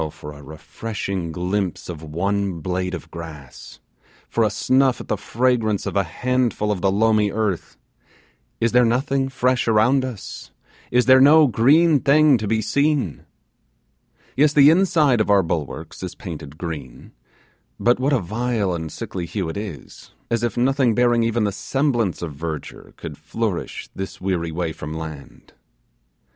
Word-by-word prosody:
for 75 0 -10
a 70 - -12
refreshing 90 +4 -5
glimpse 90 +2 -2
of 85 -4 -7
one 95 +4 -2
blade 90 +2 -2
of 85 -1 -10
grass 80 -6 -10 0.5
for 115 - +1
a 110 - +3
snuff 130 +5 +2
at - - -9
the - - +1
fragrance 110 0 0
of - - -4
a 100 - +4
handful 120 +3 -1
of 95 -4 -2
the 95 - +2
loamy 105 0 +3
earth! 105 -4 -2 0.8
Is 115 0 +1
there 125 0 +5
nothing 135 +3 +1
fresh 130 -2 0
around 115 +5 +3
us? 125 -6 -7 0.4
Is 125 0 +3
there 130 0 +7
no 155 +3 +7
green 145 +6 +4
thing 145 -1 +4
to 105 - -3
be 110 +1 0
seen? 140 - 0 1.1
Yes, 150 +2 +3
the 145 0 +7
inside 160 - +3
of 105 - -1
our 100 -2 +5
bulwarks 80 -1 -4
is 90 -2 -6
painted 75 -6 -8
green; 80 -8 -7 0.7
but 120 +1 +3
what 135 +3 +1
a 140 - +4
vile 110 0 -1
and 80 -2 -5
sickly 90 -3 -5
hue 95 -2 -3
it - - -5
is, 100 - -9 0.2
as 115 -1 +1
if 120 -2 -2
nothing 130 -2 +2
bearing 120 -1 +3
even 115 0 +1
the 100 - +1
semblance 120 - -1
of 80 -3 -5
verdure 80 +1 -7
could 75 -2 -8
flourish 95 +5 -4
this 95 0 -6
weary 90 -3 -2
way 80 -1 -3
from 75 +1 -7
land. 80 -3 -9
105 Hz, 160 wpm, -22 LUFS, 85-125 Hz, 1.1 s, there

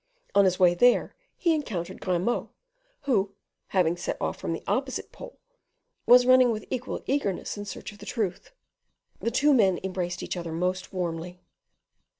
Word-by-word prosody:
On 200 - +5
his 185 -1 +2
way 180 -2 +5
there 245 +7 +3 0.2
he 340 -2 +2
encountered 190 - -4
Grimaud, 185 +6 0 0.5
who, 200 -7 0 0.3
having 175 -3 +2
set 175 - -4
off - - -2
from - - -3
the - - -4
opposite - - -2
pole, - - -11 0.7
was 245 0 +8
running 255 0 +6
with 215 -1 -4
equal 255 0 -3
eagerness 265 -10 -1
in 205 0 -6
search 205 - -7
of 205 - -16
the 205 - -10
truth. 205 -5 -3 0.7
The - - -1
two 290 +5 +3
men 195 -8 +4
embraced 180 -2 -3
each - - -3
other 170 -2 -5
most 180 +2 -2
warmly. 175 0 -4
195 Hz, 160 wpm, -27 LUFS, 180-245 Hz, 0.7 s, was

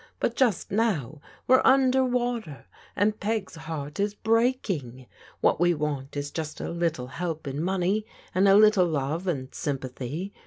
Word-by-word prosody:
But 235 - 0
just 235 -9 +1
no9f 185 - 0 0.3
we're 260 0 +5
under 265 0 +4
water, 240 - -2 0.3
and 210 +2 +1
Peg's 215 -1 -2
heart 155 -3 -6
is 205 +1 0
breaking. 210 - 0 0.4
What - - +3
we 175 0 +3
want 145 -2 -3
is 145 0 -3
just 155 -2 -5
a - - -4
little 170 -6 -1
help 160 +4 -4
in 140 +2 -3
money 190 +4 0 0.3
and 190 +2 +3
a 195 - +7
little 210 -3 +6
love 155 +3 -2
and 135 -6 -3
sympathy. 140 +4 -4
175 Hz, 155 wpm, -26 LUFS, 145-215 Hz, 0.4 s, a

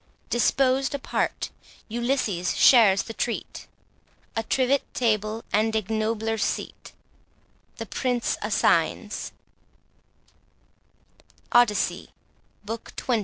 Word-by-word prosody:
Disposed 265 +3 +2
apart, 280 - -2 0.4
Ulysses 230 -6 -1
shares 210 -6 +6
the 225 - -8
treat; 235 +1 -4 0.7
A 225 - +1
trivet 260 +4 +1
table 215 -2 0
and 220 +1 +2
ignobler 220 +1 -1
seat, - - -3 0.9
The - - -5
Prince 245 -2 -1
assigns— - - 0 2.2
ODYSSEY, 240 -4 +2 0.6
Book 225 +2 -6
XXI. 240 -3 0
225 Hz, 80 wpm, -25 LUFS, 215-250 Hz, 2.2 s, shares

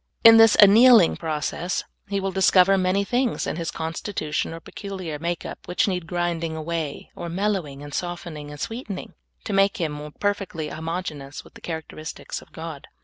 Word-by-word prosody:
In 225 0 +10
this 225 -1 +7
an7iealmg 220 -1 +7
process 160 +2 -2 0.2
he 200 0 -1
will 195 0 -2
discover 190 0 +5
many 190 +1 +2
things 245 +3 0
in - - -2
his 165 -1 -3
constitution 160 -1 -3
or 165 - -7
peculiar 185 -4 -6
makeup 170 +2 -4
which 180 - +1
need 180 -4 -2
grinding 170 -2 -1
awa}^ 160 -2 -4
or 170 - -6
mellowing 175 -7 -2
and 145 -1 -9
softening 170 -4 -5
and 145 0 -9
sweetening, 225 - -5 0.3
to 210 - -4
make 195 0 +3
him 150 -3 -4
perfectly 195 -6 -2
homogeneous 160 -4 -5
with - - -18
the - - -14
characteristics 160 -1 -6
of - - -18
God. 160 -3 -8
175 Hz, 160 wpm, -24 LUFS, 160-195 Hz, 0.3 s, In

